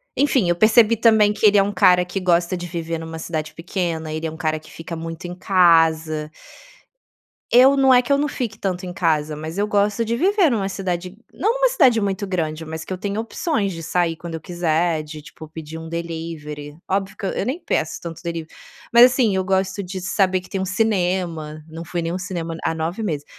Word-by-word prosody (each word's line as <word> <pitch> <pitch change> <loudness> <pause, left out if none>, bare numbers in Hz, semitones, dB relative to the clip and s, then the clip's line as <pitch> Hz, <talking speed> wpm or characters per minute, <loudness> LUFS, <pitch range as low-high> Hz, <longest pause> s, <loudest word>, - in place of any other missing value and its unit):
enfim. 270 -8 +2
Eu 175 - +3
percebi 220 +3 +5
também 220 -2 +4
que - - -11
ele 205 0 +5
é 195 - +6
um 200 - -2
cara 180 -1 +5
que 180 +2 -4
gosta 175 -1 +1
de 175 0 -5
viver 165 -1 -4
numa 160 0 -7
cidade 160 -1 -4
pequena. 165 -2 -3
Ele 160 +1 -3
é - - -5
um 160 - -10
cara 155 -1 -1
que 155 - -17
fica 165 +1 -7
muito 165 +1 -7
em 175 - -5
casa 165 -4 +3 1.3
Eu 260 +3 +7
não 265 -1 +5
é 250 - +7
que 250 - -8
eu 280 - +5
não 290 +1 0
fique 230 -6 -4
tanto 185 -2 -3
em 180 - -6
casa, 155 -4 0
mas 160 +4 -6
eu 205 - +1
gosto 210 +2 +1
de 230 +1 0
viver 375 - +3
numa 200 -5 -1
cidade 180 -1 -4 0.2
não 425 +6 +1
numa - - +2
cidade 255 - +4
muito 200 -1 -2
grande, 165 -4 -2
mas 160 0 -6
que 160 - -12
eu 185 - -2
tenha 200 +2 -3
opções 225 - -2
de 165 - -7
sair 165 0 0
quando 170 +1 -8
eu 160 - -5
quiser, 170 -1 0
de, 155 0 -9
tipo, 155 +1 -12
pedir 160 0 -8
um 160 0 -8
delivery. 160 -3 -6
Óbvio 195 0 -1
que 210 - -5
e - - -2
eu - - -1
nem 275 +8 -3
peço 155 - -1
tanto 165 -2 -8
delivery. 165 -2 -5 0.4
Mas, 235 +1 +8
assim, 245 -5 +3
eu 190 - 0
gosto 190 +1 0
de 185 0 -6
saber 190 -1 +1
que 185 - -16
tem 195 -2 -3
um - - -1
cinema. 180 -6 -1
Não 165 +1 -8
fui 175 +1 -3
em - - -4
nenhum 170 +2 -2
cinema 175 -3 -4
a - - +1
há - - -2
9 165 +6 -3
meses. 155 -8 -2
180 Hz, 230 wpm, -21 LUFS, 160-205 Hz, 1.3 s, Mas